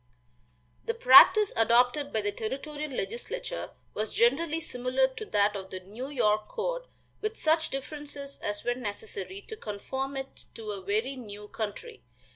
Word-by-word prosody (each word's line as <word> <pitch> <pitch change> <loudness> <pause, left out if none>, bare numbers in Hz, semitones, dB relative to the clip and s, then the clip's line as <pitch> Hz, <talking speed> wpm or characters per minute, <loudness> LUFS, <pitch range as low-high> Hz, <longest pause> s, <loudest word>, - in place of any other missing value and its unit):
The 460 - -1
practice 445 -3 +8
adopted 245 +5 +3
by 220 - +1
the 205 0 0
territorial 290 +8 -4
legislature 475 - -4 0.2
was 215 +1 -2
generally 310 +7 +3
similar 255 -4 +1
to 270 +11 -7
that 205 - +2
of 190 -1 -6
the 185 -1 -6
New 215 +8 -7
York 215 -6 +2
code, - - -3 0.3
with 430 +1 -2
such 315 +1 +2
differences 280 0 -6
as 205 0 -3
were 245 - +1
necessary 380 - -5
to 440 - -8
conform 265 - -4
it 270 0 -7
to 220 -2 -5
a 200 -2 -5
very 215 +8 -1
new 210 -4 -9
country. 425 - -5
265 Hz, 150 wpm, -29 LUFS, 215-320 Hz, 0.3 s, practice